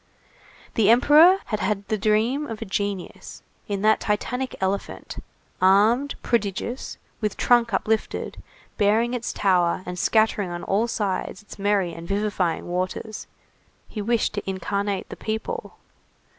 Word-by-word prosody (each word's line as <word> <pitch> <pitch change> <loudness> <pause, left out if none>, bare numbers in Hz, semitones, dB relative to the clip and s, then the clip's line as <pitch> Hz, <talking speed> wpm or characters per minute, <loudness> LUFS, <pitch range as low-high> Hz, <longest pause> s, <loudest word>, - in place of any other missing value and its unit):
The 215 -2 +3
Emperor 300 +10 +7
had 215 - -2
had 205 -2 -1
the 215 - 0
dream 220 +7 +1
of 225 -1 -6
a 225 - -5
genius; 200 -1 -4 0.2
in 200 -2 -3
that 215 0 +4
Titanic 250 +5 -2
elephant, 190 +1 -3 0.4
armed, 215 +9 +4
prodigious, 235 +2 -2 0.2
with 210 -2 -1
trunk 240 -1 +3
uplifted, 215 +2 -1 0.4
bearing 220 +4 +3
its 240 -2 -2
tower 180 -2 +2
and 180 0 -5
scattering 215 -3 +2
on 175 0 -5
all 215 +4 +1
sides 200 -2 -2
its 205 - -12
merry 200 -3 +1
and 165 0 -9
vivifying 200 -4 -1
waters, 185 +4 -4 0.6
he 215 - -5
wished 230 +2 +1
to 205 -2 -4
incarnate 195 +1 -2
the - - -7
people. 220 - -4
210 Hz, 135 wpm, -24 LUFS, 195-230 Hz, 0.6 s, Emperor